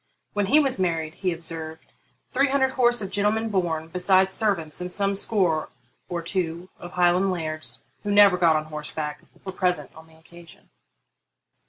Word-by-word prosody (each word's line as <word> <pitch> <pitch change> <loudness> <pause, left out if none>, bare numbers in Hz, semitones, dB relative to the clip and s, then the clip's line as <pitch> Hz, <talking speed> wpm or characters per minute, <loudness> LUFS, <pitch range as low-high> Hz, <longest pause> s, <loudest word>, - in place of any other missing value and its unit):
'When 205 -1 0
he 295 +7 +5
was 270 -8 +1
married,' 165 -3 -1
he 185 -1 -2
observed,'three 165 - -5
hundred 265 -1 +2
horse 240 -3 +2
of 195 - -6
gentlemen 210 +3 0
born, 170 -5 -1
besides 190 +2 +3
servants, 175 -8 0
and 180 0 -4
some 200 +1 +2
score 185 -6 +1 0.4
or 175 -1 -3
two 175 0 -3
of 175 - -10
Highland 180 +2 +3
lairds, 155 -3 -5 0.2
who 205 - -5
never 205 -2 +6
got 170 -3 +3
on 155 0 -1
horseback, 150 -1 -5 0.2
were 190 - -4
present 180 -7 -1
on 160 0 -15
the 160 - -21
occasion.' 170 0 -17
180 Hz, 160 wpm, -24 LUFS, 160-200 Hz, 0.4 s, never